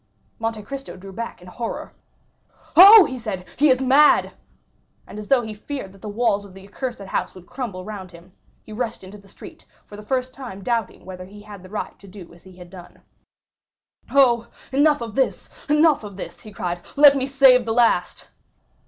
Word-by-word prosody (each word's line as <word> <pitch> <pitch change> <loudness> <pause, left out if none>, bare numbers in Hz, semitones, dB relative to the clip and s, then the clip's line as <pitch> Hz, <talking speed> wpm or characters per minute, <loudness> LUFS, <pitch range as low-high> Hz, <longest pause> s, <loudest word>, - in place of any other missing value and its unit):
Monte 225 -1 -3
Cristo 270 -3 -8
drew 195 +1 -11
back 230 -3 -7
in - - -14
horror. 230 +5 -6 0.8
"Oh," 400 +2 +10
he 260 -3 -6
said, 200 -6 -6
"he 295 +1 +3
is 255 -1 +3
mad!" 270 +3 +4 0.7
And 210 - -10
as 210 - -9
though 265 -3 +3
he 220 -1 -6
feared 215 -1 -7
that 195 - -19
the 215 - -7
walls 205 -1 0
of 195 -2 -15
the 195 0 -13
accursed 240 +2 -6
house 195 -1 -4
would 185 -1 -13
crumble 230 -8 -6
around 190 -2 -9
him, 170 +2 -16 0.3
he 215 - -12
rushed 230 -2 -4
into 195 +2 -12
the 200 - -20
street, 195 - -14 0.2
for 205 - -13
the 210 - -10
first 255 +3 -3
time 240 -8 -9
doubting 230 -2 -3
whether 185 -1 -9
he 205 +2 -14
had 205 -2 -12
the 185 - -14
right 210 - -6
to 200 - -16
do 185 -3 -13
as 170 - -19
he 185 -1 -17
had 175 -1 -13
done. 180 -2 -14 1.1
"Oh, 240 -4 +3 0.2
enough 290 +1 +3
of 230 -2 -6
this,—enough 300 +3 0
of 200 -2 -10
this," - - -8
he 215 - -12
cried; 175 -3 -4
"let 285 -1 +7
me 265 -1 -1
save 265 -3 +5
the 225 - -1
last." 235 0 +1
215 Hz, 195 wpm, -22 LUFS, 195-260 Hz, 1.1 s, Oh